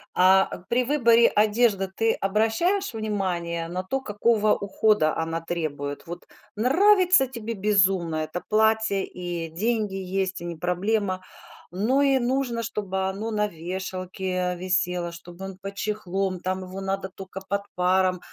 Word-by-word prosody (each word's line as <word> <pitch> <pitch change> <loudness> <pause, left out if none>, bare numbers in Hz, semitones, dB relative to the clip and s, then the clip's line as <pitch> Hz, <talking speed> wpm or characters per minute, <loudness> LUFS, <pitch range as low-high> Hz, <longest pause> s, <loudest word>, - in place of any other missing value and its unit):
А 190 +1 +4
при 250 +1 +2
выборе 235 -4 +5
одежды 210 -2 +2
ты 225 +4 0
обращаешь 225 - +1
внимание 180 -6 -2
на 180 +2 -3
то, 270 +8 -2
какого 215 -1 +2
ухода 200 -5 +2
она 165 0 -2
требует? 150 -4 -4
Вот 175 +1 -8 0.3
нравится 365 - +5
тебе 230 -3 -5
безумно 190 -5 +2
это 155 +3 -3
платье 220 -2 +2
и 175 -2 -5
деньги 210 +3 -1
есть, 190 -1 -2
и - - -6
не 170 -1 -4
проблема, 185 +2 -1 0.5
Но 230 +9 +2
и 275 -1 +4
нужно, 245 -1 -1
чтобы 190 -3 -2
оно 210 +4 -4
на 210 -1 +1
вешалке 185 +1 -3
висело, 180 -1 0
чтобы 175 +2 -10
он 195 -1 -8
под 195 +1 -8
чехлом, 195 -3 -2
там 185 +1 -2
его 185 +1 -7
надо 195 0 -2
тока 190 0 -9
под 200 0 0
паром 185 0 +2
195 Hz, 140 wpm, -25 LUFS, 180-220 Hz, 0.5 s, выборе